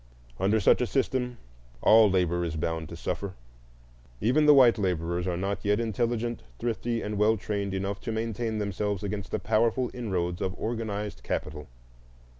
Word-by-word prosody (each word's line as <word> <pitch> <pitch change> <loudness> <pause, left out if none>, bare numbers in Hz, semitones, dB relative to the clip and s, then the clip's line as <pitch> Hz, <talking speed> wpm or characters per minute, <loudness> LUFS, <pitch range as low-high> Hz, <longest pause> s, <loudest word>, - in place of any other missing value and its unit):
Under 105 +3 +2
such 100 - +4
a 125 - +1
system 125 -2 -1 0.4
all 110 - +6
labor 90 -2 +1
is 85 -2 -3
bound 80 +1 -2
to - - -7
suffer. 100 -2 -4 0.8
Even 135 +9 +3
the 150 - +9
white 125 -4 +6
laborers 90 -2 -1
are 90 -1 -1
not 100 +2 -2
yet 105 +1 +2
intelligent, 115 0 -1 0.2
thrifty, 115 0 -2
and 105 -1 -3
well 110 +1 +4
trained 100 -1 -3
enough 100 +1 -3
to 115 - -4
maintain 110 0 -2
themselves 105 -1 -2
against 100 0 -4
the - - -1
powerful 115 +3 +1
inroads 90 -7 -2
of 95 0 -2
organized 110 -2 -3
capital. 75 -1 -4
105 Hz, 160 wpm, -28 LUFS, 95-115 Hz, 0.8 s, the